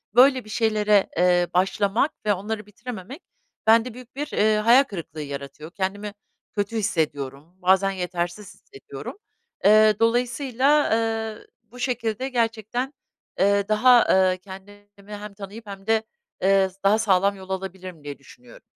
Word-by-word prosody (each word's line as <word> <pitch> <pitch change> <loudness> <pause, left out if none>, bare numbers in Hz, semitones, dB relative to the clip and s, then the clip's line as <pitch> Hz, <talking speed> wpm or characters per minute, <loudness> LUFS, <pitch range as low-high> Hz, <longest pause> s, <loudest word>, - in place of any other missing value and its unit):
böyle 255 -1 +5
bir - - -13
şeylere, 210 -2 +2
eee, 175 0 +3
başlamak 200 - +1
ve 210 - +3
onları 210 +2 -5
bitirememek 220 - -9 0.5
bende 225 +2 +4
büyük 250 +1 -13
bir, 295 +2 -3
eee, 215 +1 +3
hayal 235 +6 +6
kırıklığı 170 - -8
yaratıyor. 140 +3 -8
Kendimi 200 +2 -4 0.4
kötü 205 +2 -2
hissediyorum. 150 -5 -2
Bazen 190 +2 +3
yetersiz 180 +1 -4
hissediyorum. 410 -1 -10 0.5
Eee, 215 0 +6
dolayısıyla, 250 +4 +2
eee, 225 -1 -2 0.2
bu 230 +3 -15
şekilde 245 0 -2
gerçekten, 240 +2 -2 0.5
eee, 200 +1 +3
daha, 240 +3 +5
eee, 185 -1 +4
kendimi 195 +2 -13 0.3
hem 205 0 -9
tanıyıp 205 +3 -10
hem 195 0 -10
de, 220 0 +2 0.4
eee, 195 0 +3
s 185 - -21
daha 205 +2 +4
sağlam 200 -1 +2
yol 190 0 -12
alabilirim 185 -3 -6
diye 145 -1 -7
düşünüyorum. 125 -3 -17
205 Hz, 140 wpm, -24 LUFS, 190-230 Hz, 0.5 s, hayal